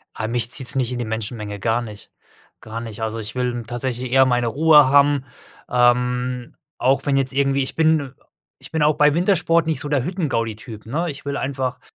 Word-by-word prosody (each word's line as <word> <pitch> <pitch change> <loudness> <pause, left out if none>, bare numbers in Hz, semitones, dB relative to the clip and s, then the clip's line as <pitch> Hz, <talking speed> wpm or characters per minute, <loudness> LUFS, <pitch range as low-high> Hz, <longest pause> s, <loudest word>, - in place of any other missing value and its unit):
Ah, 110 - -3
mich 120 0 -1
zieht's 125 0 0
nicht 130 -2 0
in 125 - -3
die 120 - -2
Menschenmenge, 110 -1 -5
gar 115 +4 0
nicht, 105 -3 -10 0.5
gar 110 +1 -6
nicht. 115 -2 -8
Also, 110 0 -3
ich 110 +1 -7
will 125 -1 -2
tatsächlich 120 +1 -4
eher 135 0 +6
meine 120 -2 +1
Ruhe 150 +2 +5
haben, 140 0 +4 0.4
ähm, 125 0 +1 0.2
auch 130 +2 +1
wenn 140 -2 +2
jetzt 135 -1 0
irgendwie 140 0 +1
ich 130 - -7
bin 155 -4 +2 0.4
ich - - -12
bin 160 -2 0
auch 150 0 +3
bei 150 -1 +5
Wintersport 170 -2 +2
nicht 160 -5 0
so 145 - -6
der 145 -4 0
Hüttengaudi-Typ, 115 - -3
ne? 160 +9 -2
Ich 145 -1 -8
will 140 0 -2
einfach 130 -2 -3
125 Hz, 195 wpm, -21 LUFS, 115-145 Hz, 0.5 s, eher